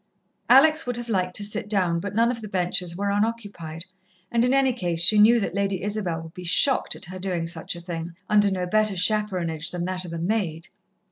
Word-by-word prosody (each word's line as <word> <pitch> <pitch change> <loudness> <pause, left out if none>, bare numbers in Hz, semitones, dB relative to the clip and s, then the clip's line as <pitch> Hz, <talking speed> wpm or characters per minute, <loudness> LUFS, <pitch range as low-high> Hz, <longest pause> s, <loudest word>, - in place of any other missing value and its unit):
Alex 310 +4 +6
would 245 -1 -2
have 240 0 -7
liked 185 -4 -1
to 205 - +1
sit 210 +1 -3
down, 180 -5 +1
but 200 +3 -6
none 230 +2 +3
of 235 -2 -6
the 215 - -7
benches 180 -2 -1
were 200 +2 -1
unoccupied, 205 -7 -3 0.5
and, 235 0 +2
in 250 - +2
any 270 -1 +3
case, 175 -8 -2
she 210 +4 +6
knew 230 +3 +6
that 195 - -3
Lady 195 -1 -1
Isabel 200 -6 -2
would 160 0 -12
be 180 - -9
shocked 215 - +2
at - - -8
her 185 +2 -8
doing 180 -3 -2
such 165 +1 -4
a 170 - -9
thing, 170 -1 -6
under 205 -1 +4
no 185 -2 -2
better 215 +2 +1
chaperonage 180 -5 0
than 175 -1 -4
that 185 0 -2
of 175 - -8
a 170 - -4
maid. 170 -3 -2
195 Hz, 220 wpm, -24 LUFS, 175-215 Hz, 0.5 s, Alex